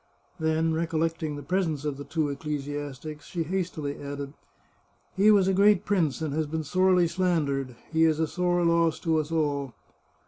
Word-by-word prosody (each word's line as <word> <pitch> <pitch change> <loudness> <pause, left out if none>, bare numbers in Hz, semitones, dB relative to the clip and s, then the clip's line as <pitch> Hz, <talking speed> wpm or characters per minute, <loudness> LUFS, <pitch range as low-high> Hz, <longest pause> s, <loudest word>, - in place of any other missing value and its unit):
Then, 160 0 +1
recollecting 160 -1 -1
the 145 - -7
presence 160 -3 -1
of 145 -2 -2
the 145 - -6
two 155 0 -1
ecclesiastics, 145 0 -5
she 170 -2 -2
hastily 160 -4 -3
added: 140 0 -6 0.4
" - - -39
He 200 +3 +5
was 200 -3 +5
a 195 - +3
great 200 0 +4
prince, 165 -7 0
and 150 -3 -2
has 155 0 -1
been 160 +1 -3
sorely 185 +3 +3
slandered. 155 -8 0 0.2
He 160 0 +4
is 160 -1 +2
a 160 - +3
sore 175 +1 0
loss 170 -1 +3
to 160 -2 +2
us 155 +1 -4
all." 145 -5 -1
160 Hz, 175 wpm, -27 LUFS, 145-175 Hz, 0.4 s, He